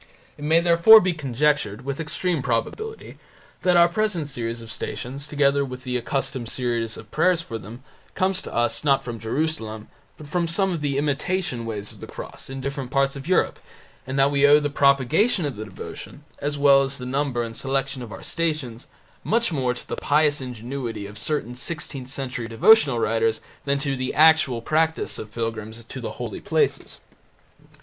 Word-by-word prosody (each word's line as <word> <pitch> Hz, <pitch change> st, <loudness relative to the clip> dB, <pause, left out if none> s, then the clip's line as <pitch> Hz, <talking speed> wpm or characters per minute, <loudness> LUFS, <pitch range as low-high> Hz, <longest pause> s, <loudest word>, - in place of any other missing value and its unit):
It 145 Hz, -, -11 dB
may 160 Hz, +3 st, +4 dB
therefore 170 Hz, +6 st, +8 dB
be 185 Hz, -3 st, 0 dB
conjectured, 135 Hz, -5 st, 0 dB
with 140 Hz, +1 st, -3 dB
extreme 165 Hz, +1 st, -1 dB
probability, 140 Hz, -, -3 dB, 0.4 s
that 180 Hz, -1 st, +4 dB
our 170 Hz, 0 st, +7 dB
present 180 Hz, -4 st, -1 dB
series 120 Hz, -4 st, -4 dB
of 115 Hz, -1 st, -9 dB
Stations, 135 Hz, +5 st, -5 dB
together 140 Hz, -1 st, +2 dB
with 130 Hz, -1 st, -7 dB
the 125 Hz, -1 st, -3 dB
accustomed 125 Hz, -1 st, -2 dB
series 115 Hz, -3 st, -2 dB
of 110 Hz, -, -12 dB
prayers 170 Hz, +1 st, +2 dB
for 115 Hz, -8 st, -6 dB
them, 115 Hz, +6 st, -11 dB, 0.3 s
comes 185 Hz, 0 st, +1 dB
to -, -, -9 dB
us, 120 Hz, +4 st, 0 dB
not 140 Hz, -2 st, +3 dB
from 120 Hz, -2 st, -6 dB
Jerusalem, 110 Hz, -3 st, -3 dB, 0.3 s
but 155 Hz, -, -11 dB
from 170 Hz, +3 st, -1 dB
some 190 Hz, +4 st, +1 dB
of 165 Hz, -, -4 dB
the 140 Hz, -2 st, -1 dB
imitation 145 Hz, -3 st, -1 dB
Ways 105 Hz, -2 st, -4 dB
of -, -, -16 dB
the -, -, -8 dB
Cross -, -, -9 dB
in 135 Hz, 0 st, -6 dB
different 140 Hz, -1 st, -4 dB
parts 135 Hz, +1 st, +1 dB
of 140 Hz, +2 st, -8 dB
Europe, 185 Hz, -, +2 dB, 0.5 s
and 135 Hz, +1 st, -3 dB
that 135 Hz, +1 st, +4 dB
we 140 Hz, -1 st, +2 dB
owe 145 Hz, +1 st, +7 dB
the 145 Hz, -1 st, -2 dB
propagation 145 Hz, -, +3 dB
of 140 Hz, -4 st, -3 dB
the 110 Hz, +1 st, -6 dB
devotion, 110 Hz, +7 st, -9 dB, 0.2 s
as 145 Hz, 0 st, -2 dB
well 140 Hz, -1 st, +6 dB
as 135 Hz, 0 st, -2 dB
the 125 Hz, -, -7 dB
number 130 Hz, -2 st, -1 dB
and 115 Hz, -1 st, -6 dB
selection 135 Hz, 0 st, -2 dB
of 120 Hz, -3 st, -8 dB
our 95 Hz, -, -9 dB
Stations, 150 Hz, -8 st, -2 dB, 0.4 s
much 230 Hz, -4 st, +1 dB
more 130 Hz, -4 st, 0 dB
to -, -, -9 dB
the -, -, -3 dB
pious 150 Hz, -1 st, +2 dB
ingenuity 125 Hz, -2 st, -5 dB
of 105 Hz, 0 st, -8 dB
certain 125 Hz, -2 st, -2 dB
sixteenth 135 Hz, -1 st, -4 dB
century 130 Hz, -3 st, -3 dB
devotional 135 Hz, -, +5 dB
writers 115 Hz, 0 st, +1 dB, 0.3 s
than 140 Hz, 0 st, +1 dB
to 140 Hz, -1 st, -1 dB
the 130 Hz, 0 st, -3 dB
actual 155 Hz, -6 st, +5 dB
practice 160 Hz, +3 st, 0 dB
of 105 Hz, -, -8 dB
pilgrims 115 Hz, 0 st, -4 dB
to 115 Hz, -, -8 dB
the -, -, -5 dB
holy -, -, -6 dB
places. -, -, 0 dB
140 Hz, 185 wpm, -24 LUFS, 120-155 Hz, 0.5 s, therefore